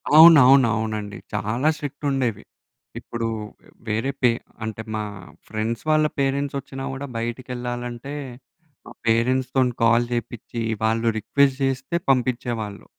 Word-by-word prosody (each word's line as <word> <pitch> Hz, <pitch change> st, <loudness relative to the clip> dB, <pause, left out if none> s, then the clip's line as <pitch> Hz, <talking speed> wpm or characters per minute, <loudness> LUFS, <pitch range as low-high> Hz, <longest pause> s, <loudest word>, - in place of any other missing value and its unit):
అవునవును. 140 Hz, -6 st, +9 dB
అవునండి. 110 Hz, -2 st, -3 dB, 0.2 s
చాలా 110 Hz, +8 st, 0 dB
స్ట్రిక్ట్ 145 Hz, 0 st, -6 dB
ఉండేవి. 125 Hz, -6 st, -1 dB, 0.6 s
ఇప్పుడు 115 Hz, -1 st, -4 dB, 0.6 s
వేరే 115 Hz, +5 st, 0 dB
పే 125 Hz, -2 st, +5 dB, 0.3 s
అంటే 110 Hz, 0 st, -4 dB
మా 110 Hz, -, -1 dB, 0.5 s
ఫ్రెండ్స్ 110 Hz, +2 st, -3 dB
వాళ్ళ 155 Hz, 0 st, +4 dB
పేరెంట్స్ 140 Hz, +1 st, 0 dB
ఒచ్చినా 135 Hz, 0 st, -8 dB
గూడా 135 Hz, +1 st, -5 dB
బయటికేళ్ళాలంటే 120 Hz, +2 st, -4 dB, 0.7 s
మా -, -, -11 dB, 0.2 s
పేరెంట్స్‌తోని 125 Hz, +2 st, +2 dB
కాల్ 115 Hz, +1 st, +4 dB
జేపిచ్చి 120 Hz, 0 st, -4 dB, 0.2 s
వాళ్ళు 115 Hz, +1 st, +1 dB
రిక్వెస్ట్ 135 Hz, +5 st, +2 dB
జేస్తే 135 Hz, +5 st, -2 dB
పంపిచ్చేవాళ్ళు. 120 Hz, -5 st, -1 dB
120 Hz, 110 wpm, -23 LUFS, 115-135 Hz, 0.7 s, అవునవును